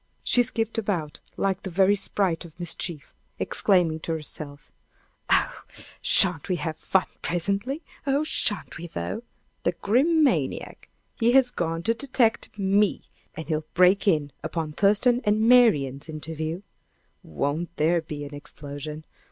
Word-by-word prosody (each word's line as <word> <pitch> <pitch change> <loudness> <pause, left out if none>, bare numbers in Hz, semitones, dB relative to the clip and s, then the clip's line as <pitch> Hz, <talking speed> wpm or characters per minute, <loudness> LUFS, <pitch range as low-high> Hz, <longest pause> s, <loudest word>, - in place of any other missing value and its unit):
She 245 - +4
skipped 225 -1 -1
about 175 -8 -3 0.2
like 195 -1 0
the 190 - -6
very 190 +3 +3
sprite 195 -3 -1
of 170 0 -15
mischief, 170 -3 -4 0.2
exclaiming 175 -5 +2
to 165 - -3
herself: 150 -2 -6 0.6
"Oh, - - +2 0.4
shan't 180 -3 +4
we 180 - +1
have 160 -1 -3
fun 185 +3 +1 0.2
presently! 200 - -2 0.2
Oh, 280 +2 +2
shan't 210 -9 -1
we, 170 - -6
though! 85 - -4 0.4
The 175 - 0
Grim 280 - +2
maniac! 280 - -1 0.3
he 235 0 +3
has 260 -2 +8
gone 165 0 -2
to 230 - +2
detect 235 -4 0
me! 200 +1 +1 0.3
And 160 -2 -7
he'll 155 -1 -2
break 185 +3 +4
in 150 -6 +2
upon 160 0 -3
Thurston 210 +7 +3
and 215 +2 +2
Marian's 155 - +4
interview. 160 +3 -5 0.6
Won't 145 - -3
there 165 +2 +2
be 150 -2 -7
an 145 - -10
explosion! 145 +1 -8
175 Hz, 140 wpm, -25 LUFS, 155-210 Hz, 0.6 s, has